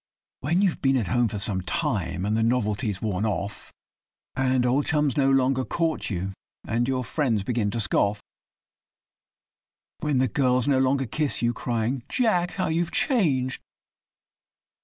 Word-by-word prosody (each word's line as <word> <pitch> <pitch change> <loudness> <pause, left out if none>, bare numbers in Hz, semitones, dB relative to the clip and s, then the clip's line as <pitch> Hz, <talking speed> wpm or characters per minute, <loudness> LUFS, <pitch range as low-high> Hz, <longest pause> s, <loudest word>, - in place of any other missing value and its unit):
When 170 +9 +1
you've 185 -4 0
been 135 -1 +3
at 105 -8 -1
home 120 +4 +2
for 110 - -4
some 100 -2 +1
time, 90 -1 -2
and 105 +1 0
the 115 - +1
novelty's 110 -3 0
worn 100 -2 -1
off, 105 -1 -3 0.6
And 130 -1 +1
old 130 +4 +1
chums 150 -4 +1
no 135 -1 +3
longer 130 -1 +2
court 165 +3 -1
you, 95 -1 -3 0.3
and 120 +2 0
your 130 -1 0
friends 120 -7 0
begin 110 -1 0
to 115 - -3
scoff; 100 0 +1 1.8
When 150 -3 0
'the 130 0 +2
girls' 125 0 +1
no 135 -2 +3
longer 135 +1 +2
kiss 145 +2 -1
you, 120 0 +2
crying 120 +2 -2
'Jack! 180 -8 +1
how 185 - -1
you 160 +1 0
have 170 - -2
changed! 170 - +1
125 Hz, 160 wpm, -25 LUFS, 110-140 Hz, 1.8 s, been